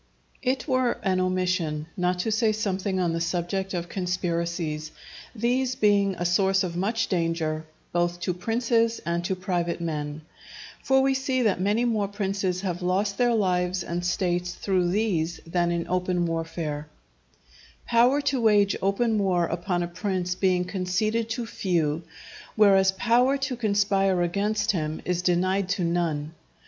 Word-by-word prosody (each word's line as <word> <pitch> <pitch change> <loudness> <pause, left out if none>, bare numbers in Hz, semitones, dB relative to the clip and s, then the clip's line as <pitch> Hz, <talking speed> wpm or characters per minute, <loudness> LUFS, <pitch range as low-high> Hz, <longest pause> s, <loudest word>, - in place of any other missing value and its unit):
_ - - -38 0.4
It 260 +2 -1
were 255 -3 +2
an 185 -2 +1
omission 185 -4 0
not 180 0 0
to 220 - -1
say 220 0 +2
something 195 -3 -1
on 175 -2 +1
the 165 - -2
subject 180 +3 -2
of 175 -1 -3
conspiracies, 170 -4 -2 0.5
these 250 +3 0
being 200 -3 +3
a 175 - -3
source 190 +2 +3
of 175 -2 -4
much 210 +6 0
danger 165 -3 -1 0.3
both 175 0 0
to 180 - -1
princes 230 +4 +1
and 170 +1 -1
to 190 - 0
private 180 -2 -2
men. 150 -2 -4 0.6
For 265 0 +3
we 270 0 +3
see 265 -1 0
that 200 -5 +1
many 210 +5 +2
more 215 -4 +1
princes 195 -2 -2
have 180 -2 -3
lost 195 +3 0
their 240 -1 +3
lives 180 -3 +1
and 175 +1 -3
states 180 0 -1
through 185 -3 0
these 180 -5 0
than 175 +1 0
in 170 -1 -2
open 180 -1 0
warfare; 165 -2 -3 1.0
power 245 +5 +4
to 280 -3 0
wage 205 -3 +4
open 215 +3 +1
war 180 -3 +2
upon 175 +1 -2
a - - -2
prince 180 0 -2
being 180 -1 +1
conceded 210 +5 -1
to 235 +1 -3
few, 165 -8 -1 0.5
whereas 195 -3 +5
power 240 +7 +3
to 270 -1 -2
conspire 200 -4 +2
against 205 +4 0
him 155 -4 -2
is 180 -1 0
denied 185 +2 +1
to 195 -2 0
none. 165 -3 -1
185 Hz, 155 wpm, -26 LUFS, 175-210 Hz, 1.0 s, whereas